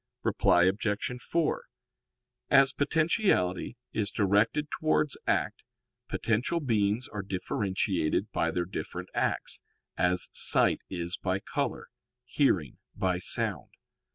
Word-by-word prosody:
Reply 85 - +3
Obj. 105 +6 -1
4: 165 +3 0 0.9
As 135 0 +6
potentiality 145 - +1 0.2
is 105 -2 0
directed 110 +9 +1
towards 155 -2 +1
act, - - 0 0.5
potential 120 +10 0
beings 110 -4 0
are 105 - -5
differentiated 95 -2 -1
by 85 - 0
their 85 +1 -1
different 95 - -6
acts, - - -2 0.4
as 90 0 +2
sight - - +3
is 85 -1 -4
by 95 0 -1
color, - - -3 0.4
hearing 100 - +1 0.2
by 95 -3 0
sound. - - 0
105 Hz, 105 wpm, -29 LUFS, 90-135 Hz, 0.9 s, As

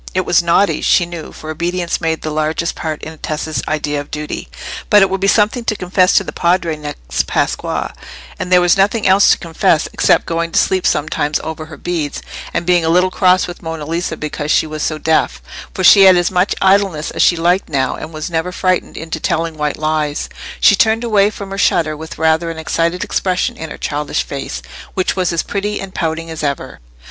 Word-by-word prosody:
It 185 -1 +1
was 175 - +4
naughty, 170 +4 +2
she 175 - +3
knew, 170 -2 -8
for 155 - -8
obedience 175 +2 -2
made 160 -1 -1
the 155 - -3
largest 155 +2 -1
part 155 -2 -5
in 160 +1 -7
Tessa's 155 0 -3
idea 150 -1 -1
of 145 - -12
duty; 150 0 -5 0.4
but 205 -2 +7
it 190 - +1
would 195 0 -2
be 195 - +2
something 215 +4 +2
to 215 - 0
confess 185 0 +2
to - - +4
the - - -6
Padre 170 -2 +1
next 145 - -4
Pasqua, - - -1 0.5
and 185 0 -4
there 180 -1 +6
was 175 -1 +4
nothing 205 +3 +2
else 190 +2 +5
to - - +5
confess 165 -2 +1
except - - +3
going 165 0 -2
to - - +4
sleep 185 -1 +1
sometimes 150 0 0
over 160 0 -6
her 155 -2 -11
beads, 160 -3 -3 0.3
and 170 - -2
being 175 -1 +3
a 160 - +1
little 180 +2 +3
cross 185 -1 +3
with 175 - -9
Monna 160 -2 -5
Lisa 165 +1 -3
because 150 0 -4
she - - +3
was 155 -1 -6
so 155 - -1
deaf; 160 +1 +1 0.3
for 185 - -4
she 195 +2 +8
had 185 -1 +7
as 175 +1 +1
much 180 +2 +1
idleness 190 -5 +2
as - - -2
she 175 - +5
liked 175 +3 +1
now, 135 -4 0
and 155 - -8
was 155 -1 -5
never 170 +1 -2
frightened 185 0 -1
into 160 0 -5
telling 165 +1 -1
white 150 -1 -2
lies. 155 -1 -1 0.3
She 205 - +6
turned 220 +3 +2
away 210 -3 +3
from 200 -2 -8
her 195 - -4
shutter 160 -4 +2
with 160 +1 -9
rather 160 +1 +2
an 165 - -6
excited 165 +2 -1
expression 185 -1 -1
in 160 - -7
her - - -8
childish 145 0 -2
face, 140 -1 -6 0.3
which 185 - 0
was 185 -2 0
as 170 -1 0
pretty 205 +1 -3
and 195 -1 -7
pouting 165 0 -3
as 160 - -6
ever. 140 -3 -3
170 Hz, 215 wpm, -16 LUFS, 155-185 Hz, 0.5 s, she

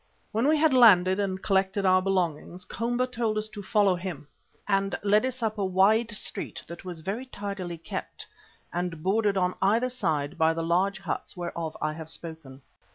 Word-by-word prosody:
When 230 +5 +1
we 310 +1 +4
had 305 -2 +3
landed 190 -6 +6
and 190 -2 -2
collected 195 0 +1
our 185 0 +5
belongings, 180 -1 -1
Komba 240 +4 -1
told 235 -4 -2
us 215 0 -1
to 210 -1 -8
follow 200 -1 +3
him, 175 -5 -6 0.4
and 195 -1 +1
led 210 +4 +3
us 255 -1 -5
up 215 -1 -1
a - - +1
wide 195 +5 +3
street - - -4
that 170 - -9
was 175 -3 -7
very 210 +10 -4
tidily 200 -6 -5
kept 165 - -6 0.5
and 175 -2 -3
bordered 205 +1 +2
on 180 -1 +1
either 225 +6 +3
side 150 - -1
by 160 0 +3
the 165 - -2
large 185 +4 +1
huts 195 0 -4
whereof 170 -2 -4
I 155 - 0
have 160 0 -8
spoken. 160 -5 -9
190 Hz, 180 wpm, -27 LUFS, 170-215 Hz, 0.5 s, landed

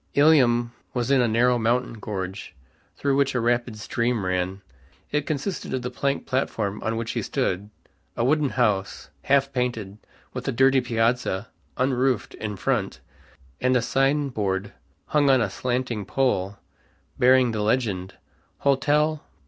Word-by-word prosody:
Ilium 125 -6 +4 0.2
was 120 +1 0
in 135 -2 +5
a 120 - +3
narrow 120 +2 +3
mountain 120 +2 +1
gorge, 95 -3 -5 0.4
through 140 -1 +1
which 140 -1 +1
a - - +2
rapid 120 -1 0
stream 115 0 -1
ran. 90 +1 -2 0.5
It 150 -1 -1
consisted 155 +1 -3
of 130 - -3
the 125 - -3
plank 140 +2 -1
platform 105 -6 -2
on 110 +1 -2
which 115 0 -3
he - - -2
stood, 95 +3 -2 0.5
a 115 - +1
wooden 150 +1 +2
house, 105 -7 -1
half 140 0 +2
painted, 115 -5 -2 0.3
with 125 +1 -5
a - - +2
dirty 135 +2 +4
piazza 115 -4 0 0.3
(unroofed) 130 -2 +1
in 105 -1 -5
front, 105 -1 -1 0.6
and 130 0 +3
a - - +1
sign 140 +3 +1
board 100 -4 -2 0.3
hung 145 - +2
on 130 -1 +5
a 115 - 0
slanting 125 -3 -2
pole 100 -6 0 0.6
bearing 125 -1 +5
the 110 -1 -2
legend, 105 -5 -1 0.5
"Hotel. 150 +3 +2
125 Hz, 150 wpm, -24 LUFS, 105-135 Hz, 0.6 s, in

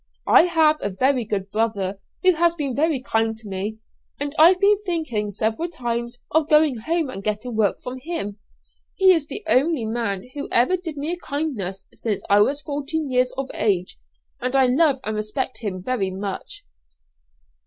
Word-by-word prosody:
I - - +6
have 320 -3 +3
a 200 - -1
very 255 +5 +1
good 200 -2 -3
brother, 205 -3 -1 0.2
who 370 0 +6
has 340 +1 +2
been 280 -6 -3
very 300 -3 +1
kind 225 -4 0
to 220 -1 -11
me, 200 +3 -4 0.4
and 285 0 -3
I've 350 +4 +7
been 405 +1 +4
thinking 310 - -2
several 220 - -1
times 240 -5 -3
of 310 -1 +2
going 300 -4 +4
home 320 +7 -1
and 195 - -7
getting 215 +3 -3
work 215 -3 +1
from 255 +1 -7
him. 255 -9 -4 0.6
He 380 -1 +6
is 325 -5 +2
the 415 - -4
only 280 -2 +2
man 220 -3 -2
who 285 - -5
ever 250 +10 +4
did 335 -5 -6
me 295 +4 -2
a 350 - -3
kindness 245 - -4
since 215 -3 -3
I 205 - +6
was 280 +8 +2
fourteen 290 0 -3
years 250 0 +2
of 270 0 -3
age, 185 - -1 0.4
and 255 +2 -2
I 265 -1 +5
love 275 +2 +3
and 215 0 -3
respect 215 +5 -3
him 185 -5 -4
very 215 -4 -1
much." 195 +1 -6
255 Hz, 180 wpm, -23 LUFS, 215-315 Hz, 0.6 s, I've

